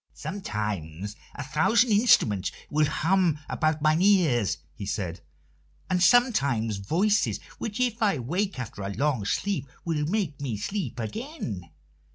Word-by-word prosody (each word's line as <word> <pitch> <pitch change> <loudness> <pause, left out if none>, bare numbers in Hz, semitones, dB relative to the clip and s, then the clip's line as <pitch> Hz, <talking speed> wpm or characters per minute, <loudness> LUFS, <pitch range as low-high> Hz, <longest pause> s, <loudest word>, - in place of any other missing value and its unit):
"Sometimes 105 - -4 0.2
a 145 - -5
thousand 220 - +3
instruments 120 - +4 0.2
will 155 0 +3
hum 175 0 +2
about 155 -1 0
mine 155 +2 +3
ears," 165 - +3 0.2
he 75 - -8
said, 90 -4 -3 0.7
"and 180 - +2
sometimes 140 - +3
voices, 185 - +1 0.2
which, 220 +1 -4
if 240 -2 0
I 205 -3 +4
awake 175 - -2
after 115 -5 -6
a 100 - -3
long 130 0 0
sleep, 145 - -1 0.2
will 160 -3 0
make 170 -7 -1
me 125 -7 -2
sleep 190 - -3
again. 120 - -5
150 Hz, 135 wpm, -27 LUFS, -, 0.7 s, instruments